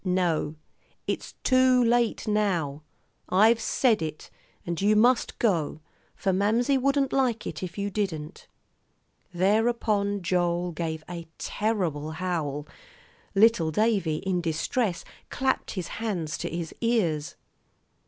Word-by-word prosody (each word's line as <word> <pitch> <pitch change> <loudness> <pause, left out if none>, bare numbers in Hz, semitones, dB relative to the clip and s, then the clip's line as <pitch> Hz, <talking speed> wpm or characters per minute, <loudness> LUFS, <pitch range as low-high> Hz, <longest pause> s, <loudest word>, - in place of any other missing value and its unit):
"No, 175 -5 0 0.5
it's - - -4
too 255 -1 +4
late 235 -1 +1
now. 180 -9 0 0.5
I've 220 +5 +5
said 230 -4 +2
it, 155 -1 -5 0.3
and 170 0 -3
you 210 +2 +4
must 240 +3 +3
go; 170 -9 0 0.4
for 190 - 0
Mamsie 230 +8 +2
wouldn't 275 +1 +1
like 250 -5 +1
it - - -5
if 180 0 -6
you 200 0 -2
didn't." 170 -7 -4 0.8
Thereupon 205 +1 +1
Joel 175 0 0
gave 160 -1 -4
a 170 -2 -7
terrible 175 -9 -2
howl. 155 -4 -3 0.7
Little 200 -5 +5
Davie, 195 -4 +1
in 185 -2 0
distress, 170 +4 -1 0.2
clapped 265 0 -1
his 180 -2 -3
hands 195 -8 -3
to - - -3
his 170 -1 -4
ears. 180 -11 0
190 Hz, 120 wpm, -27 LUFS, 165-225 Hz, 0.8 s, I've